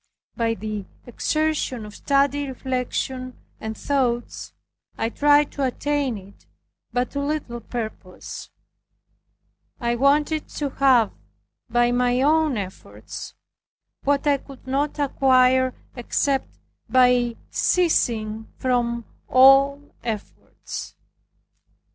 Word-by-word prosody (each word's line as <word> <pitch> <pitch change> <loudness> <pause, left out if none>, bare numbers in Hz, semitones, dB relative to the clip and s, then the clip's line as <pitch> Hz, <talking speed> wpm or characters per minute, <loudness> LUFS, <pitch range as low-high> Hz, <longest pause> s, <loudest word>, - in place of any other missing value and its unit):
By 230 -2 0
the 210 -1 -5 0.2
exertion 300 -2 -1
of 210 - -10
studied 280 +3 +1
reflection 255 0 -3 0.2
and 220 0 -5
thoughts 250 -4 -1 0.5
I 225 - 0
tried 290 +3 +4
to 280 - -3
attain 275 -1 0
it 195 +1 -15 0.4
but 245 0 -1
to 280 - -3
little 280 -4 -2
purpose. 220 -5 -7 1.3
I 235 -2 0
wanted 295 +5 +2
to 285 -2 -3
have, 260 -6 +4 0.6
by 240 0 +3
my 245 0 +2
own 310 -3 +3
efforts, 190 -2 -8 0.7
what 285 0 +1
I 285 -1 +4
could 275 -1 -14
not 280 +4 -1
acquire 260 -2 +3 0.2
except 270 +2 0 0.4
by 250 -2 +4 0.2
ceasing 225 -11 +1
from 235 -2 0 0.2
all 275 +2 +5
efforts. 220 -4 -6
255 Hz, 100 wpm, -23 LUFS, 235-280 Hz, 1.3 s, all